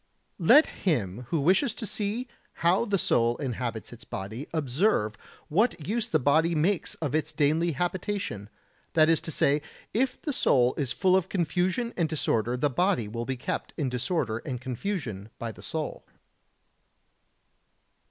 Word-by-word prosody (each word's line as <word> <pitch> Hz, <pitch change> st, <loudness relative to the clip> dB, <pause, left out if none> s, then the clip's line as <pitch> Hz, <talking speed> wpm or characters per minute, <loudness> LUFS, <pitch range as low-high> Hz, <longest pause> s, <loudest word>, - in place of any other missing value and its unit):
Let 245 Hz, -, +7 dB
him 120 Hz, -, -2 dB
who 165 Hz, -, +1 dB
wishes 195 Hz, -, +3 dB
to 225 Hz, -, -5 dB
see 215 Hz, +5 st, -2 dB, 0.4 s
how 180 Hz, +6 st, +4 dB
the 205 Hz, -3 st, +1 dB
soul 120 Hz, -8 st, +2 dB
inhabits 120 Hz, -4 st, -4 dB
its 120 Hz, -, -12 dB
body 110 Hz, +8 st, -6 dB
observe 145 Hz, -, +1 dB, 0.3 s
what 195 Hz, -2 st, +1 dB
use 230 Hz, +3 st, -1 dB
the -, -, +3 dB
body 160 Hz, +5 st, +3 dB
makes 170 Hz, +4 st, +1 dB
of 145 Hz, -4 st, -3 dB
its 155 Hz, 0 st, 0 dB
daily 160 Hz, +3 st, +2 dB
habitation; 180 Hz, -, -3 dB, 0.4 s
that 155 Hz, -1 st, +5 dB
is 165 Hz, -, +4 dB
to -, -, -6 dB
say, 145 Hz, 0 st, +2 dB, 0.3 s
if 255 Hz, +3 st, 0 dB
the 295 Hz, -, -3 dB
soul 125 Hz, -, +3 dB
is 140 Hz, -5 st, -2 dB
full 185 Hz, -2 st, +3 dB
of 190 Hz, -1 st, +1 dB
confusion 185 Hz, +6 st, 0 dB
and 165 Hz, -3 st, 0 dB
disorder 120 Hz, -6 st, 0 dB
the 145 Hz, -, +2 dB
body 160 Hz, -, +1 dB
will 115 Hz, +2 st, -4 dB
be 130 Hz, 0 st, -3 dB
kept 125 Hz, -, -4 dB
in 145 Hz, -5 st, 0 dB
disorder 125 Hz, -2 st, -1 dB
and 125 Hz, -1 st, -5 dB
confusion 125 Hz, -, -4 dB
by 115 Hz, -1 st, -4 dB
the -, -, -14 dB
soul. 160 Hz, -1 st, -4 dB
155 Hz, 155 wpm, -28 LUFS, 125-190 Hz, 0.4 s, Let